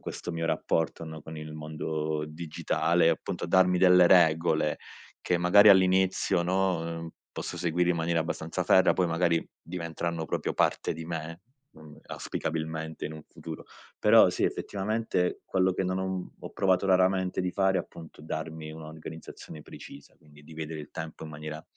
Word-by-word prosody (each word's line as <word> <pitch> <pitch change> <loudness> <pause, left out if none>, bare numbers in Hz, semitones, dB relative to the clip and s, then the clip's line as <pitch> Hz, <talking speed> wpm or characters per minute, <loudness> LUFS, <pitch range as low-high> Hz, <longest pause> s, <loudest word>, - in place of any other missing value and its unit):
questo - - -6
mio 80 -1 -3
rapporto, 80 0 -1
no, 80 -1 -8
con 80 +1 -9
il 75 0 -8
mondo 75 0 -3
digitale. 80 +1 0
Appunto, - - -2
darmi 90 0 +4
delle 90 -1 +6
regole 80 -3 +4 0.4
che 90 - 0
magari 90 +4 +6
all'inizio, 95 -1 +4
no, 95 0 +1
uhm, 85 0 -5 0.2
posso - - -5
seguire 90 +1 +1
in 85 - +1
maniera 85 0 0
abbastanza 80 +2 -3
ferrea. 95 - +5
Poi 90 - +1
magari 85 0 +1
diventeranno 85 -1 -4
proprio - - -2
parte - - +1
di 80 +1 -7
me, 80 0 -6 0.3
mhmm, 80 -1 -15
auspicabilmente 80 0 -4
in 80 - -7
un 80 - -10
futuro. 80 -1 -9 0.3
Però - - +6
sì, - - -1
effettivamente 100 -2 -1
quello 95 0 +1
che 95 - -2
non 95 0 -1
ho 95 - -2
uhm, 95 -1 -4
ho - - -9
provato 95 -1 +1
raramente 95 0 +2
di 90 0 -1
fare, 95 0 +2
appunto, 80 -2 -9
è 75 - -13
darmi 80 0 -5
un'organizzazione 80 0 -10
precisa. 70 - -12
Quindi, 75 -1 -19
di 80 - -13
vedere 80 0 -5
il 75 - -11
tempo 80 -1 -7
in 80 - -8
maniera 75 +1 -7
85 Hz, 165 wpm, -28 LUFS, 80-90 Hz, 0.4 s, delle